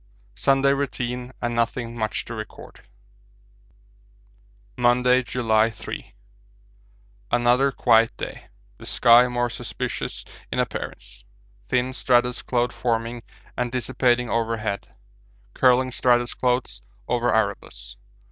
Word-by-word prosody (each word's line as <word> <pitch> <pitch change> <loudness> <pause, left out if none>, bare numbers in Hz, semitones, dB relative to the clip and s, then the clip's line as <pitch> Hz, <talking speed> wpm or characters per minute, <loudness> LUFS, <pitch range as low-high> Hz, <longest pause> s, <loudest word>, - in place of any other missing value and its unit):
Sunday 135 - +3
routine 125 -3 -3
and 120 0 -1
nothing 115 0 -1
much 110 -2 -2
to 120 - -7
record. 110 -1 -10 1.9
Monday, 125 +1 +3
July 115 -3 +1
3. 110 - -8 1.1
Another 120 +3 +3
quiet 115 -3 +3
day, - - -7 0.3
the - - -8
sky 120 +1 +6
more 120 0 0
suspicious 120 - -5 0.3
in - - -3
appearance. - - -4 0.4
Thin 125 0 0
stratus 125 -1 +2
cloud 120 -1 0
forming 115 0 -2 0.3
and 125 -1 -2
dissipating 125 0 +1
overhead, 115 -3 -2 0.7
curling 130 0 +3
stratus 120 -1 +2
clouds 125 0 -1 0.3
over 120 0 +1
Erebus. 105 -3 -2
120 Hz, 100 wpm, -24 LUFS, 115-125 Hz, 1.9 s, sky